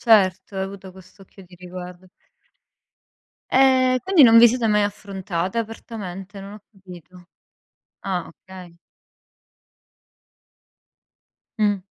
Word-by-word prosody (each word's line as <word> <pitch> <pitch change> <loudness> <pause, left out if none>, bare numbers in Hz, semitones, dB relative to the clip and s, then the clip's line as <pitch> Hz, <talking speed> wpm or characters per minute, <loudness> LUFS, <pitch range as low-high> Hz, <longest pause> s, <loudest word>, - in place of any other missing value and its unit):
Certo, 195 -4 +2
hai 190 - -2
avuto 195 -1 -10
questo 190 +1 -17
occhio 195 0 -17
di 180 0 -18
riguardo. 180 0 -10 1.4
Ehm, 255 -1 +4
quindi 375 -6 +4
non 230 -2 +8
vi 235 0 +8
siete 240 -1 -1
mai 210 -1 +2
affrontate, 195 -1 -4
apertamente? 205 -4 -7
Non 200 +1 -10
ho 210 - -14
capito. 180 -3 -15 0.8
Ah, 185 -3 -3
okay. 180 -1 -14 2.8
Mh. 205 -2 +1
195 Hz, 105 wpm, -22 LUFS, 185-220 Hz, 2.8 s, non